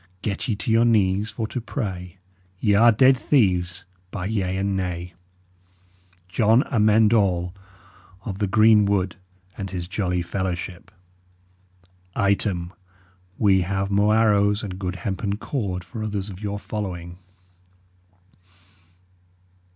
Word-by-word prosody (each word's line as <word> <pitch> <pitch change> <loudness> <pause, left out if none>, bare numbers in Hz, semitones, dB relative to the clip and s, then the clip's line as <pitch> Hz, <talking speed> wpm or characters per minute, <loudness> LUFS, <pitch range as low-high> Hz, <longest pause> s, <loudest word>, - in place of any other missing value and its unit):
Get 100 -2 -2
ye 110 - 0
to 105 +2 -3
your 115 +1 +5
knees 105 -3 +2
for 110 +1 -4
to 125 - -4
pray: 95 -7 -5 0.4
Ye 105 -1 +2
are 115 +4 +6
ded 130 +4 +5
theeves, 90 -9 +1 0.3
by 90 -1 -5
yea 95 -3 -1
and 100 0 -1
nay! 90 -1 -4 1.1
"JON 110 +6 +3
AMEND 110 -2 +4
ALL 90 -5 +1 0.7
of 100 -3 -5
the 105 - +1
Green 110 +1 +5
Wood, 95 -2 0 0.4
And 95 -1 -4
his 90 -2 -4
jolly 90 -2 -1
fellaweship. 90 0 -4 1.3
"Item, 95 -3 0 0.6
we 95 -3 +4
have 95 +2 -2
mo 100 +1 +3
arrowes 105 -1 +3
and 95 -3 -6
goode 90 -1 -3
hempen 100 +2 -3
cord 100 -8 -3
for 95 +5 -8
otheres 105 -1 -3
of 95 +1 -11
your 100 -1 -3
following." 90 -5 -6
100 Hz, 125 wpm, -23 LUFS, 90-110 Hz, 1.3 s, are